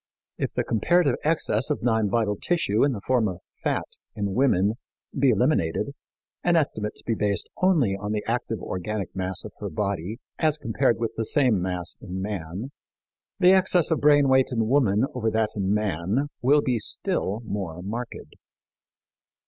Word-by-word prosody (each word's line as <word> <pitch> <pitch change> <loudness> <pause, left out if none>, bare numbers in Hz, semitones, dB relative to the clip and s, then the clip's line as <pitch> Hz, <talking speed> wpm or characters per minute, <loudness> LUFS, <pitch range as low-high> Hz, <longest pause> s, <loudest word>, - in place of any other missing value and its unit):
If - - -1
the - - +1
comparative 140 - +2
excess 150 -6 +1
of 150 - -2
non 110 -3 +2
vital 105 -1 +1
tissue 110 - +1
in 140 - +3
the 105 - -6
form 125 -4 +2
of 90 -3 -5 0.2
fat - - 0 0.3
in 100 -2 -2
woman 110 -3 +2 0.4
be 135 0 +3
eliminated 115 - +1 0.5
and 175 -1 +3
estimates 110 -9 -1
be 115 - 0
based 100 -4 -1
only 155 - +3
on 105 +1 -4
the 105 -1 -1
active 115 -1 -2
organic 95 +1 -4
mass 95 -1 -2
of 105 - -9
her 105 - -4
body, 100 0 -3 0.2
as 155 -2 +2
compared 120 -2 +1
with 115 -1 -1
the 115 - -1
same 125 - +3
mass 90 -1 -3
in 95 -2 -6
man, 95 - -5 0.7
the 180 -1 +6
excess 185 -3 +3
of 160 - +1
brain 145 -1 +5
weight 130 0 +4
in 115 -3 0
woman 120 -4 +3
over 115 -3 0
that 110 -1 +1
in 100 -2 0
man 105 - 0
will 145 +4 +4
be 125 -3 0
still 105 +1 -1
more 90 -5 -4
marked. 115 +5 -6
110 Hz, 165 wpm, -25 LUFS, 100-135 Hz, 0.7 s, the